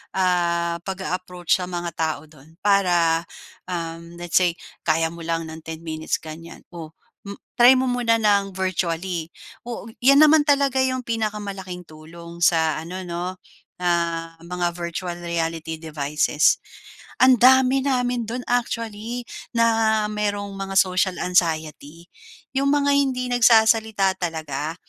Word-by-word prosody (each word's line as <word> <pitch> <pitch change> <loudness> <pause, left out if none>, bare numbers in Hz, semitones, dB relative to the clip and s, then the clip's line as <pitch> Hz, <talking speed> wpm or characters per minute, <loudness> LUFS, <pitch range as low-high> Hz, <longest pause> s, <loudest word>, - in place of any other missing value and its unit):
ah, 170 -2 +1
pag-a-approach 185 -2 -2
sa 180 - -3
mga 175 -1 -4
tao 160 -2 -1
dun. 155 +1 -19
Para, 175 -5 +3 0.4
uhm, 170 -1 -6
let's 175 -1 0
say 180 -2 +2 0.3
kaya 160 +1 +2
mo 170 - -11
lang 165 -1 -2
ng 160 - -8
10 160 0 -7
minutes 160 -1 -3
ganyan 165 +1 -10
o 165 -2 -9 0.7
try 245 +2 +8
mo 260 0 +1
muna 240 -2 +2
ng 200 -3 +1
virtually. 175 -2 -2 0.4
Oh, 240 - -5 0.2
yan 275 +4 +6
naman 305 0 +5
talaga 280 -2 +3
yung 255 -1 0
pinakamalaking 205 -5 -4
tulong 170 +2 -12
sa 160 -2 +2
ano 180 +3 -7
no, 175 +1 -4 0.5
ah, 170 -1 -1
mga 175 +1 -2
virtual 175 0 -5
reality 165 -1 -3
devices. 150 -1 +1 0.6
Ang 255 -3 +6
dami 260 +1 +6
namin 245 -3 0
do'n 245 +2 -4
actually 230 -1 -2 0.3
na 225 -2 +3
merong 205 -1 -2
mga 195 0 -5
social 185 -1 +2
anxiety, 165 -2 -1 0.4
yung 275 +1 0
mga 285 0 +2
hindi 260 -3 +1
nagsasalita 220 -4 +4
talaga. 160 -3 -3
180 Hz, 130 wpm, -23 LUFS, 165-225 Hz, 0.7 s, try